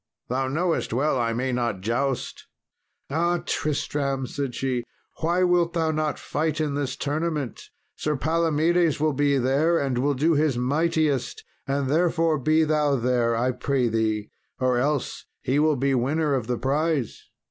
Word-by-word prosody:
Thou 130 +2 0
knowest 165 0 -1
well 135 +2 +1
I 115 -1 +1
may 125 +3 -1
not 120 -6 -1
joust." 120 +5 -2 0.6
"Ah, 170 +3 +1
Tristram," 140 -2 -1
said 135 0 -4
she, 130 -3 -1 0.4
"why 170 +3 +1
wilt 175 -1 +2
thou 165 -2 +1
not 155 -1 -1
fight 155 +1 -2
in 150 -2 0
this 140 -2 -2
tournament? 150 -3 -3 0.3
Sir 150 0 -1
Palomedes 165 +2 +2
will 155 0 +2
be 140 0 +2
there, 140 +7 +2
and 135 -5 0
will 140 +2 +1
do 155 +6 +2
his 150 -4 +2
mightiest; 145 +1 0 0.2
and 135 0 0
therefore 165 +1 +2
be 155 +4 +3
thou 150 -2 +2
there, 120 -2 +1
I 125 +3 +1
pray 125 0 0
thee, 110 -2 -1 0.3
or 130 -1 +2
else 145 +1 -2 0.2
he 135 +3 +1
will 155 0 +3
be 135 +1 +1
winner 145 +4 +1
of 125 -5 -1
the 125 -1 -1
prize." 140 0 -1
140 Hz, 160 wpm, -25 LUFS, 125-155 Hz, 0.6 s, be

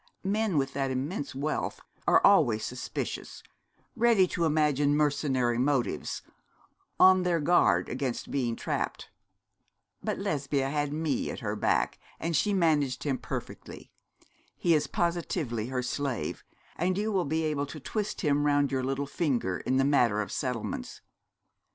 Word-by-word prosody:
Men 205 -3 +1
with 135 0 0
that 135 -1 -1
immense 135 +1 -3
wealth 150 +3 -2 0.3
are - - +5
always 120 - +4
suspicious, 125 +1 -5 0.5
ready 230 -5 +4
to 170 - 0
imagine 150 -2 +2
mercenary 135 -5 +1
motives, 135 -1 0 0.8
on 185 0 +7
their 175 -2 +1
guard 105 - +3
against 125 -1 -3
being 120 -4 0
trapped. - - -3 0.9
But - - -1
Lesbia 140 -1 -1
had 145 -1 -1
me 155 -1 -1
at - - -6
her - - -2
back, - - +1 0.2
and 165 0 -1
she 180 +9 +2
managed 155 -9 +2
him 135 -3 -1
perfectly. - - -7 0.7
He 170 - +3
is 150 -2 +2
positively 170 - -1
her 130 -1 -2
slave; 125 - -3 0.3
and 180 +3 0
you 215 +2 0
will 190 -3 +1
be 160 +3 0
able 150 -2 -1
to 155 - -8
twist 210 - -3
him 145 -2 +2
round 145 -1 +2
your 130 -1 0
little 135 +2 -1
finger 130 - -1
in 130 - 0
the 135 - +3
matter 120 -7 +3
of 105 - -3
settlements. 125 - -4
145 Hz, 145 wpm, -29 LUFS, 130-165 Hz, 0.9 s, on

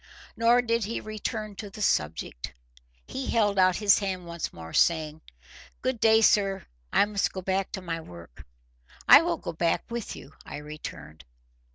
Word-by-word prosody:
Nor 235 +2 +4
did 230 -2 0
he 225 - -3
return 215 0 -5
to 210 - -6
the 210 +1 -6
subject. 75 - -1 0.5
He 265 -1 -5
held 205 -4 +2
out 185 -1 +5
his 205 0 +4
hand 190 -3 -3
once 170 -1 -5
more, 80 0 -10
saying— 160 -2 +2 0.6
"Good 255 -2 -1
day, 220 0 +5
sir. 195 -3 +3 0.3
I - - +4
must 205 -1 -1
go 185 - -6
back 190 +1 -1
to 190 - -5
my 165 -2 -3
work." 85 - -13 0.6
"I 280 +4 +10
will 340 0 -1
go - - -6
back 165 +1 0
with 235 -2 -4
you," 140 - -12
I - - -8
returned. 150 - -9
195 Hz, 170 wpm, -27 LUFS, 160-220 Hz, 0.6 s, I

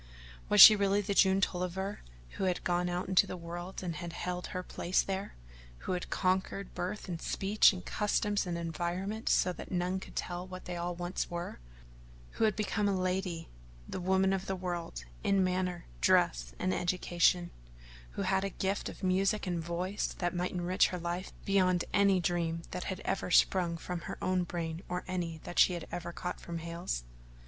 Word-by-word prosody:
Was 210 - +4
she 215 +2 +13
really 200 0 +2
the 200 0 -2
June 190 0 +4
Tolliver 190 +2 -2 0.3
who - - -3
had 180 -1 0
gone 175 0 +1
out 175 +1 -2
into 185 -1 +4
the 185 - -5
world 175 +2 -6
and 170 -4 -3
had 170 +1 -6
held 180 +1 -3
her 180 - -4
place 180 0 0
there; 195 +1 -4 0.5
who - - -2
had 180 -1 -2
conquered 190 +1 -1
birth 190 +5 -4
and 170 -3 -4
speech 200 +2 +4
and 180 -3 -7
customs 205 -1 0
and 170 -1 -2
environment 175 +6 -3
so 180 - +3
that - - -9
none 180 +1 0
could - - -12
tell 175 +1 -3
what 185 0 -9
they 180 - -4
all 175 0 -3
once 175 +1 -3
were; 175 - -5 0.7
who - - +1
had 215 -3 +2
become 210 -1 0
the - - +2
lady, 185 -2 -1 0.4
the - - -4
woman 190 +1 +3
of 195 0 -2
the 195 - -1
world, 175 - -4 0.2
in 195 -1 +3
manner, 180 -1 -1 0.2
dress, - - +3
and 95 - 0
education: 175 - +2 0.6
who 200 - -2
had 190 0 +1
a 195 - -1
gift 195 +1 -2
of - - -11
music 195 +3 +2
and 175 -2 -1
a - - -2
voice 175 +4 -2
that 175 0 -1
might 180 0 -1
enrich 180 +1 +2
her 180 - -4
life 175 +2 -3
beyond 185 -3 +3
any 200 -2 +4
dream 170 -1 -1
that 180 - -4
had 190 - -4
ever 190 - -2
sprung 175 -1 +3
from 180 +1 -4
her - - -6
own 185 -1 +1
brain 165 -1 -4
or 180 0 -2
any 175 -3 -3
that 175 - -3
she 180 - +6
had 170 -2 -5
ever 175 0 -4
caught 180 +1 -5
from 170 -1 -5
Hale's? 170 - -4
180 Hz, 190 wpm, -32 LUFS, 175-190 Hz, 0.7 s, she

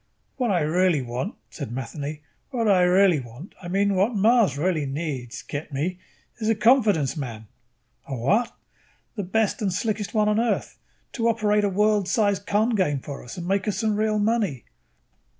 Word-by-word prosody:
"What 250 -3 0
I 180 -4 +2
really 165 -1 +2
want," 125 - -4 0.2
said 140 -8 -6
Matheny, 145 +4 -5 0.3
"what 235 -5 -1
I 190 -3 +5
really 180 -2 +4
want 125 - -11
I 175 - -8
mean 200 +3 +1
what 200 +5 +1
Mars 215 - +3
really 155 -2 0
needs, 135 -4 -4
get 150 +1 -6
me? 165 +7 -2 0.4
is 220 -1 -1
a 225 - +3
confidence 210 - +3
man." 115 -7 -6 0.6
"A 135 - -4
what?" 205 - +1 0.6
"The 210 - -2
best 205 +4 0
and 200 -3 0
slickest 210 +3 -2
one 210 -1 +3
on 210 +1 +2
Earth, 235 0 -1 0.3
to 230 -2 -1
operate 210 -2 +2
a 205 - +2
world 210 0 +2
size 205 -3 +2
con 210 +4 +1
game 180 -9 +1
for 140 +1 -8
us 120 - -9
and 175 0 -5
make 195 +1 0
us 210 - -1
some 220 -2 0
real 215 0 +1
money." 205 - 0
190 Hz, 180 wpm, -24 LUFS, 150-215 Hz, 0.6 s, I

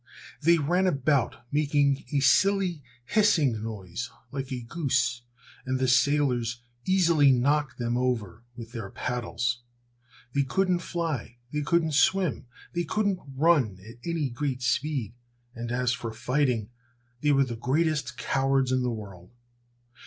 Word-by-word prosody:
They 170 +3 +5
ran 175 +5 +2
about 140 -7 +1
making 145 -2 +2
a 145 -2 +1
silly, 185 +3 +3 0.2
hissing 145 - +2
noise 105 0 -5 0.2
like 135 -1 -5
a 125 -1 -3
goose, 130 -3 0 0.4
and 130 0 -1
the 130 0 +1
sailors 125 -3 +2 0.2
easily 170 -6 +4
knocked 135 +1 +1
them 120 -1 -1
over 115 -6 -1
with 115 -2 -9
their 115 -5 -6
paddles. 120 0 -2 0.7
They 140 - +2
couldn't 180 +6 +1
fly, 160 -10 -3 0.2
they 150 - 0
couldn't 160 +1 +1
swim, 155 0 +2 0.3
they 175 0 0
couldn't 200 +2 0 0.2
run 140 - +3
at 115 - -11
any 165 -6 -1
great 130 0 -3
speed, 130 -4 0 0.4
and 120 -1 -5
as 125 0 +1
for 120 -2 -4
fighting, 120 -1 0 0.5
they 150 - +3
were 135 -1 +4
the 120 -2 -5
greatest 150 +6 0
cowards 135 -1 +1
in 130 0 +2
the 125 - 0
world. 100 -6 -8
135 Hz, 140 wpm, -27 LUFS, 120-155 Hz, 0.7 s, They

